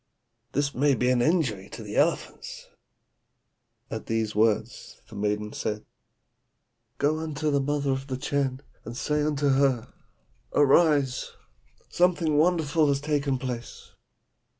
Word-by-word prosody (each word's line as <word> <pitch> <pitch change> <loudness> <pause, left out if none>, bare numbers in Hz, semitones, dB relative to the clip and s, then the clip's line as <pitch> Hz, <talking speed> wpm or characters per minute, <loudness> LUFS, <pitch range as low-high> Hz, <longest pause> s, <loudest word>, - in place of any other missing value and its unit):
This 140 0 0
may 140 +1 +3
be 125 +1 +1
an 125 -1 +2
injury 120 - +1
to 115 - -8
the 105 0 -7
elephants.' - - -1 1.2
"At - - -5
these 110 -1 -1
words 110 +2 0
the 110 - -12
maiden 105 +1 -2
said, 105 0 -3 1.1
'Go 150 +2 +1
unto 155 -1 -2
the 140 -1 +2
mother 145 0 0
of 135 +1 -3
the 130 -2 -3
Chan, 135 -1 -1 0.2
and 120 - -7
say 150 +2 0
unto 145 -1 +1
her, 135 -3 +1 0.6
"Arise! 145 -2 +3 0.6
something 175 -3 +2
wonderful 155 -1 +3
has 140 -1 +2
taken 145 -2 0
place."' 125 -2 -6
140 Hz, 125 wpm, -26 LUFS, 120-150 Hz, 1.2 s, may